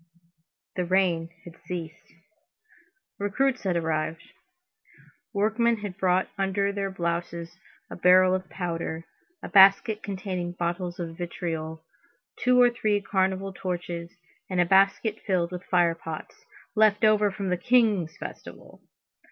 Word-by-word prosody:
The 180 - +1
rain 175 -2 +1 0.2
had 175 -1 -13
ceased. 165 -2 -7 1.1
Recruits 250 +6 0
had 185 -3 0
arrived. 160 -1 -2 1.1
Workmen 225 +3 +1
had 200 -3 -5
brought 185 -1 +1
under 200 +1 +1
their 200 -1 -2
blouses 170 -1 -4 0.3
a - - -8
barrel 185 +1 +5
of 185 -1 -3
powder, 165 -2 -4 0.4
a - - -4
basket 200 +2 +6
containing 185 -3 -4
bottles 175 +1 -3
of 165 -1 -5
vitriol, 160 -2 -5 0.5
two 250 0 +3
or 245 -1 +6
three 215 -3 0
carnival 190 -1 -1
torches, 175 -2 -5 0.4
and 185 -1 -1
a 175 - +5
basket 195 +4 +3
filled 180 -3 +1
with 180 0 -6
fire 175 -2 +3
pots, 165 -1 -9 0.3
"left 215 0 +4
over 210 -1 +4
from 195 -1 -4
the 180 - +2
King's 205 -6 +2
festival." - - -10
185 Hz, 125 wpm, -26 LUFS, 170-200 Hz, 1.1 s, basket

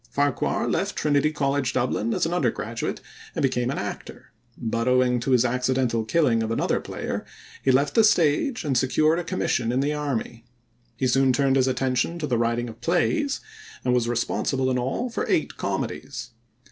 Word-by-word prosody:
Farquhar 145 -2 0
left - - -1
Trinity 150 0 +2
College, 140 -3 0
Dublin, 120 -3 0
as - - +1
an 165 - -1
undergraduate 115 -7 -2 0.3
and - - -1
became 125 -2 +1
an 140 - -2
actor, - - -7 0.3
but 115 +1 -2
owing 125 -1 +3
to 115 - -3
his 125 -1 +4
accidental 125 -2 +1
killing 120 -4 +2
of 110 - -2
another 115 - 0
player - - -4 0.4
he - - 0
left 140 +2 +3
the 225 - +5
stage 195 - +2
and 140 -3 0
secured 155 +6 +2
a - - -3
commission 130 -9 -1
in 125 - +1
the 145 +2 +1
army. 135 -5 -3 0.5
He 130 - 0
soon 135 +1 +3
turned 135 +1 +2
his 130 -1 +3
attention 130 +4 0
to 160 - -3
the 125 -5 0
writing 120 +1 0
of 115 -1 -11
plays, 275 - +1 0.4
and 125 - +2
was 120 -1 +1
responsible 130 +2 0
in 125 - +1
all 135 - -2
for - - -3
eight - - +1
comedies. 120 -2 -4
130 Hz, 180 wpm, -25 LUFS, 120-145 Hz, 0.5 s, the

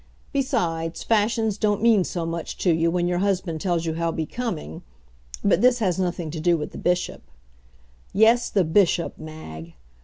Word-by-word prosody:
Besides, 170 - -1
fashions 220 -1 +1
don't 210 -1 +1
mean 225 -5 +5
so 175 -1 -3
much 165 0 -4
to 175 - +2
you 165 +1 +2
when 175 +1 0
your 175 0 0
husband 185 -5 -1
tells 175 -3 0
you 160 - -1
how 165 +1 -1
becoming 160 - -4 0.6
but 200 - +3
this 250 0 +5
has 190 -6 0
nothing 175 -3 -2
to 160 - -5
do 170 +1 +3
with 150 - -5
the - - -8
Bishop. 180 0 -1 0.9
Yes, 230 +3 +4
the 195 - +2
Bishop, 170 0 +2
Mag! 85 - -9
175 Hz, 165 wpm, -24 LUFS, 165-210 Hz, 0.9 s, mean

